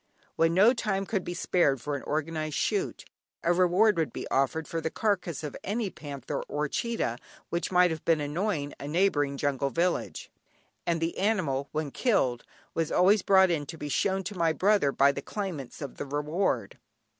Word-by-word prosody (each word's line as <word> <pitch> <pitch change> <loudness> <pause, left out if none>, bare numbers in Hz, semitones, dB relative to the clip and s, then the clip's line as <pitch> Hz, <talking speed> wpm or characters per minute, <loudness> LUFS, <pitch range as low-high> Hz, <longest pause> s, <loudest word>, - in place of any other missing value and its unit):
When 165 +1 +2
no 210 +7 +6
time 195 -5 -1
could 195 -2 -1
be 175 - -5
spared 170 -6 +2
for 145 +4 -3
an 140 - -4
organised 155 0 -2
shoot, 395 -2 -1 0.4
a 170 - +3
reward 185 +3 +4
would 155 -7 0
be - - -6
offered 140 +4 0
for 165 - -3
the 160 - -1
carcase 180 -6 -1
of 150 - -5
any 205 0 -2
panther 140 -2 -5
or 150 +2 -1
cheetah 185 - -2 0.3
which 170 +2 -2
might 180 -1 +5
have 160 -1 -5
been 165 -2 +3
annoying 150 0 -2
a 140 - -6
neighbouring 145 -4 +1
jungle 140 -1 0
village, 170 +4 -1 0.6
and 170 -1 +1
the 165 +1 -2
animal, 165 -10 0
when 155 -2 -2
killed, 130 - +1 0.3
was 165 -1 -1
always 200 +3 +5
brought 190 -1 +5
in 150 -4 -1
to 165 - -7
be 150 - -5
shown 190 +6 +1
to 200 +3 -6
my 165 -2 +2
brother 195 -5 +3
by 140 +1 +4
the 140 - -5
claimants 165 - -5
of 140 - -7
the - - -4
reward. 145 - -1
165 Hz, 185 wpm, -28 LUFS, 145-190 Hz, 0.6 s, no